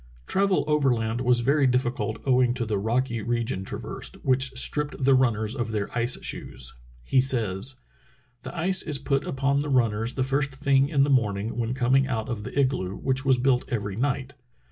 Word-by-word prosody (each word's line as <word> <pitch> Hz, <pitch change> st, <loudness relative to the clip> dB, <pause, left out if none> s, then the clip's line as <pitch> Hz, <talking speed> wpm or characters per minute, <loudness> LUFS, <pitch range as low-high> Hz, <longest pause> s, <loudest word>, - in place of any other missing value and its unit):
Travel 195 Hz, 0 st, +1 dB
overland 125 Hz, -6 st, +1 dB
was 125 Hz, -1 st, +3 dB
very 140 Hz, +3 st, +3 dB
difficult 125 Hz, -3 st, -1 dB
owing 125 Hz, -2 st, +3 dB
to 120 Hz, -, -2 dB
the 105 Hz, -2 st, -1 dB
rocky 115 Hz, +2 st, -1 dB
region 115 Hz, -3 st, -2 dB
traversed, -, -, -5 dB
which 130 Hz, +1 st, +3 dB
stripped 150 Hz, +1 st, 0 dB
the 135 Hz, +1 st, +5 dB
runners 115 Hz, -4 st, +1 dB
of 120 Hz, -4 st, -3 dB
their 105 Hz, 0 st, -3 dB
ice 120 Hz, +1 st, +2 dB
shoes. 60 Hz, -1 st, -3 dB, 0.3 s
He 130 Hz, -, +3 dB
says: 125 Hz, 0 st, 0 dB, 0.6 s
"The 175 Hz, -, -8 dB
ice 185 Hz, +2 st, +2 dB
is 150 Hz, -3 st, 0 dB
put 140 Hz, 0 st, -1 dB
upon 140 Hz, +1 st, 0 dB
the 145 Hz, +1 st, -3 dB
runners 115 Hz, -3 st, +1 dB
the 130 Hz, -, 0 dB
first 140 Hz, +1 st, 0 dB
thing 135 Hz, 0 st, +2 dB
in 140 Hz, -2 st, +3 dB
the 140 Hz, -, +1 dB
morning 110 Hz, -4 st, 0 dB
when 120 Hz, +1 st, -2 dB
coming 135 Hz, +1 st, +2 dB
out 110 Hz, -5 st, -3 dB
of 110 Hz, -4 st, -4 dB
the 140 Hz, -, -4 dB
igloo, 130 Hz, -9 st, 0 dB
which 130 Hz, 0 st, -1 dB
was 130 Hz, -1 st, +4 dB
built 125 Hz, 0 st, +2 dB
every 105 Hz, -6 st, -3 dB
night. 135 Hz, +2 st, -2 dB
130 Hz, 185 wpm, -25 LUFS, 115-135 Hz, 0.6 s, the